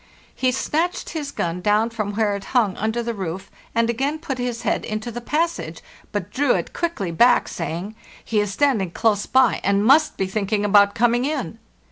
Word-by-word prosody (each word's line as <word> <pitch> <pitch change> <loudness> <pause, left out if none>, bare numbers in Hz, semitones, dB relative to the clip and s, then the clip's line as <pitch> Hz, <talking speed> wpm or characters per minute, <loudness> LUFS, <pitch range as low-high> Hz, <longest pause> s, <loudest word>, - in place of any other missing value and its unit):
He 255 -1 +1
snatched 325 +7 -1
his 300 -4 -4
gun 175 -8 -3
down 210 +4 +2
from 215 -3 -3
where 210 -2 +1
it 200 - -7
hung 210 -6 +2
under 220 +3 -1
the 235 0 -2
roof 190 -1 -5 0.2
and 230 0 +3
again 270 +6 -1
put 290 -5 -5
his 245 -1 -3
head - - 0
into 215 +2 -4
the 240 +1 -6
passage, 300 - -2 0.3
but 205 -2 -4
drew 265 +2 +2
it - - -3
quickly 330 - -2
back, 235 +9 +4
saying, 175 +5 -4 0.3
'He 220 - +1
is 205 -1 0
standing 220 -6 +1
close 205 +3 0
by, 260 0 +3
and 200 +1 +2
must 305 +6 +4
be 190 - 0
thinking 205 +1 -1
about 200 0 +5
coming 240 +1 +2
in. 280 - -3
220 Hz, 190 wpm, -22 LUFS, 200-260 Hz, 0.3 s, about